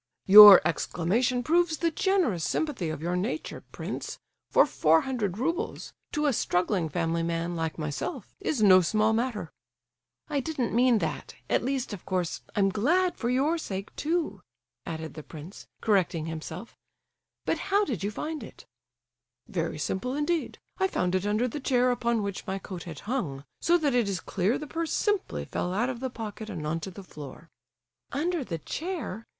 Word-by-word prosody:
"Your 205 0 +12
exclamation 245 +9 0
proves 330 +2 +2
the 335 +1 +1
generous 345 - +1
sympathy 255 - -1
of 155 0 -5
your 175 +1 -1
nature, 215 +12 -3
prince; - - -5 0.3
for - - +6
four 160 - +3
hundred 215 -8 -2
roubles—to 300 +1 -3
a 285 - +3
struggling 180 -4 0
family 165 +1 -1
man 170 +1 -2
like 160 -1 -3
myself—is 215 - -3
no 185 -2 +8
small 215 +5 +2
matter!" 225 -7 -2 0.8
"I 290 -2 0
didn't 270 -4 -2
mean 245 0 +4
that; - - -6 0.2
at - - +2
least, 260 -3 -2
of 195 - -7
course, 180 -3 -2
I'm 195 -1 +3
glad 340 - +2
for 240 - -2
your 285 +7 +2
sake, 195 -8 -6
too," 315 - -1 0.5
added 160 -1 -5
the 155 - -8
prince, 160 +5 -11
correcting 185 -7 +1
himself, 160 +8 -7 0.7
"but—how 405 +1 +1
did 225 - -3
you 200 - 0
find 305 +8 -4
it?" - - -11 0.8
"Very - - -2
simply 250 +8 -2
indeed! 315 +2 -1 0.2
I 380 - +3
found 180 - -1
it 185 +2 0
under 215 +4 +1
the 270 +5 -5
chair 255 -2 +2
upon 235 -2 0
which 200 +1 -5
my 190 0 -2
coat 185 -2 -8
had 165 -4 -8
hung; 175 - -3 0.2
so 345 +1 +4
that 295 -5 0
it 240 -5 +2
is 190 -2 -2
clear 195 +5 0
the 300 - -6
purse 325 +2 -3
simply 415 -2 0
fell 180 - -3
out 240 +5 +1
of 245 - -7
the 260 +1 -3
pocket 220 -2 -7
and 165 -7 -5
on 160 +2 -1
to 180 - -6
the 195 +1 -10
floor!" 150 -1 -11 0.6
"Under 330 +3 -1
the 170 -9 -4
chair? 300 - -5
215 Hz, 170 wpm, -28 LUFS, 180-280 Hz, 0.8 s, Your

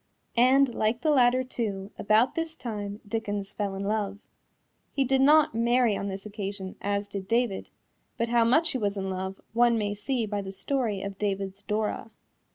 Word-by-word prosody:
And 255 +1 +5
like 220 +3 0
the 310 - +2
latter, 255 -2 +4
too, 210 -6 -4
about 215 +5 +3
this 325 -1 -3
time 205 -5 -5
Dickens 205 -2 -3
fell 200 -2 -2
in 195 - -4
love. 205 -1 -1 0.7
He 275 - +1
did 265 +1 +2
not 300 0 +6
marry 235 -1 +3
on 200 - -3
this 195 0 -5
occasion, 200 -2 -5
as 200 0 -1
did 195 -1 -6
David, 230 -3 0 0.5
but 230 0 0
how 235 -1 +4
much 310 +8 +3
he 260 - -2
was 205 -2 -1
in 190 -1 -2
love 190 +1 -4
one 235 0 +4
may 205 -2 -1
see 235 +3 -1
by 205 -1 -2
the 195 -1 -6
story 215 -1 -1
of 200 -1 -6
David's 195 -1 -2
Dora. 210 +2 -2
215 Hz, 180 wpm, -27 LUFS, 200-245 Hz, 0.7 s, not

